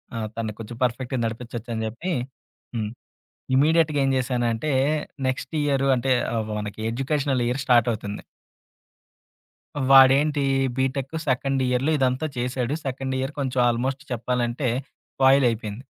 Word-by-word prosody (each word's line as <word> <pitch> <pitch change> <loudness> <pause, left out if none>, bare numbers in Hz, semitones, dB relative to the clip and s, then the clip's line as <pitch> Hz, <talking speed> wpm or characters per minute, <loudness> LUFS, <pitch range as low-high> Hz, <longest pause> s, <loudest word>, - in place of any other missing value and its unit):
ఆ - - -3 0.2
తన్ని 110 -2 -3
కొంచెం 115 +1 -8
పర్ఫెక్ట్‌గా 125 +1 -1
నడిపించోచ్చని 115 0 -4
జేప్పి. 165 +12 -4 0.6
హ్మ్. 110 -2 -2 0.7
ఇమ్మీడియట్‌గేంశానంటే, 135 -4 +2 0.6
నెక్స్ట్ 130 0 -3
ఇయరు 135 -2 +1
అంటే, 130 +2 +1 0.2
ఆ! - - 0 0.2
మనకి 105 0 -6
ఎడ్యుకేషనల్ 135 0 0
ఇయర్ 125 +3 -1
స్టార్టవుతుంది. 115 -4 +1 1.7
వాడేంటి 135 +2 +6 0.3
బీటెక్ 135 +2 -1
సెకండ్ 135 +1 +1
ఇయర్‌లో 125 +5 +1
ఇదంతా 130 +2 +1
చేశాడు. 125 +1 -2
సెకండ్ 130 0 -3
ఇయర్ 135 +3 -3
కొంచెం 130 -2 0
ఆల్మోస్ట్ 130 +4 -1
చెప్పాలంటే 125 +2 -1 0.5
స్పాయిల్ 135 0 +5
అయిపోయింది. 110 +1 -5
130 Hz, 110 wpm, -24 LUFS, 120-135 Hz, 1.7 s, వాడేంటి